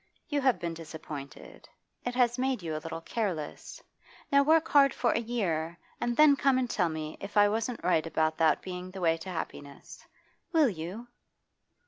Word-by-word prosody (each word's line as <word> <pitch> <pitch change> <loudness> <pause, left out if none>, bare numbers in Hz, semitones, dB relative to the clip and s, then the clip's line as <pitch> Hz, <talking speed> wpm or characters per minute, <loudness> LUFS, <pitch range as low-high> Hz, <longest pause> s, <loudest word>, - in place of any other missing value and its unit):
You 290 -2 0
have 260 -3 +3
been 170 -1 -3
disappointed; 155 -3 -9 0.3
it 245 0 -3
has 245 -1 +2
made 260 -6 0
you 160 -2 -3
a 155 - -4
little 165 +1 -6
careless. 180 -7 -4 0.5
Now 280 0 +6
work 315 +3 +4
hard 280 -2 +5
for - - +2
a - - +1
year 175 -9 -2 0.2
and 240 0 -1
then 300 -2 +7
come 275 -1 +3
and 255 -1 0
tell 180 -7 +1
me 155 -1 -5
if 200 +2 -6
I 205 0 +7
wasn't 225 +3 -2
right 165 -3 +2
about 160 -1 +1
that 160 -2 +3
being 180 0 -6
the 190 0 -8
way 165 -2 +3
to 165 +3 -8
happiness. 145 -5 -7 0.5
Will 310 -5 +5
you? 190 +6 -6
190 Hz, 180 wpm, -29 LUFS, 165-245 Hz, 0.5 s, then